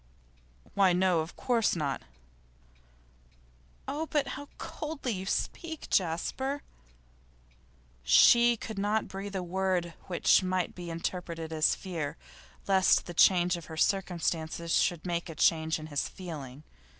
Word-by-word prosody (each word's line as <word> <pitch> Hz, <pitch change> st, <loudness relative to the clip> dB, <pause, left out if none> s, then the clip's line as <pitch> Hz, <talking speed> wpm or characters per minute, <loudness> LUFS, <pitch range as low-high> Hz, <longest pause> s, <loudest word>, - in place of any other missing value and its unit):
'Why 195 Hz, -3 st, +4 dB
no, 180 Hz, -1 st, +3 dB
of 160 Hz, +2 st, -4 dB
course 235 Hz, -6 st, +1 dB
not.' 145 Hz, -5 st, -2 dB, 1.9 s
'Oh, 315 Hz, +2 st, -3 dB
but 295 Hz, -2 st, 0 dB
how 285 Hz, +2 st, -6 dB
coldly 300 Hz, -5 st, -4 dB
you 190 Hz, -2 st, -4 dB
speak, 320 Hz, -, -3 dB
Jasper!' 235 Hz, -, 0 dB, 1.4 s
She 235 Hz, -, +6 dB
could 220 Hz, -2 st, -6 dB
not 210 Hz, +2 st, 0 dB
breathe 195 Hz, +1 st, -6 dB
a 185 Hz, -, -2 dB
word 180 Hz, -1 st, -1 dB
which 180 Hz, +1 st, +4 dB
might 185 Hz, -1 st, -1 dB
be 175 Hz, -1 st, -8 dB
interpreted 165 Hz, -1 st, -4 dB
as 155 Hz, -1 st, +3 dB
fear 165 Hz, -6 st, -5 dB, 0.5 s
lest 190 Hz, -1 st, +4 dB
the 175 Hz, -, -7 dB
change 180 Hz, 0 st, +5 dB
of 170 Hz, -, -9 dB
her 160 Hz, -, -9 dB
circumstances 170 Hz, -3 st, -1 dB
should 175 Hz, -3 st, +1 dB
make 170 Hz, 0 st, -2 dB
a 165 Hz, -, -7 dB
change 160 Hz, +1 st, +2 dB
in 155 Hz, -, -8 dB
his 145 Hz, -2 st, -2 dB
feeling. 150 Hz, -7 st, -8 dB
180 Hz, 130 wpm, -29 LUFS, 165-200 Hz, 1.9 s, She